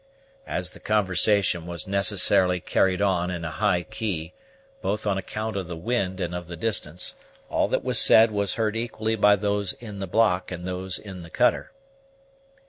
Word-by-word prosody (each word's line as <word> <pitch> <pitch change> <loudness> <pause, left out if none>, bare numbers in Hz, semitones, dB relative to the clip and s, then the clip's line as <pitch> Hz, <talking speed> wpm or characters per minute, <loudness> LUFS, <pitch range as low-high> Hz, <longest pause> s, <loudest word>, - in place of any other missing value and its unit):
As 90 0 -2
the - - -13
conversation 100 -3 +1
was 85 -2 -5
necessarily 100 -2 +2
carried 95 +3 0
on 90 -3 0
in 85 -2 -5
a 80 - -4
high 85 +3 0
key, 85 -3 -5 0.5
both 105 - -3
on 100 -2 0
account 110 +2 -5
of 95 -3 -4
the 85 -2 -7
wind 95 -1 -2
and 90 -2 -3
of 90 -1 -6
the 85 0 -8
distance, 90 -4 -2 0.4
all - - +1
that - - -2
was - - +6
said 110 0 +8
was 100 -2 -1
heard 110 -1 -1
equally 110 -1 -2
by 105 -1 +4
those 100 -1 -1
in 105 -4 -10
the 95 - -5
block 95 -2 +1
and 90 -1 -7
those 90 0 -3
in 95 -4 -10
the 85 - -12
cutter. 125 +9 0
95 Hz, 180 wpm, -24 LUFS, 90-105 Hz, 0.5 s, said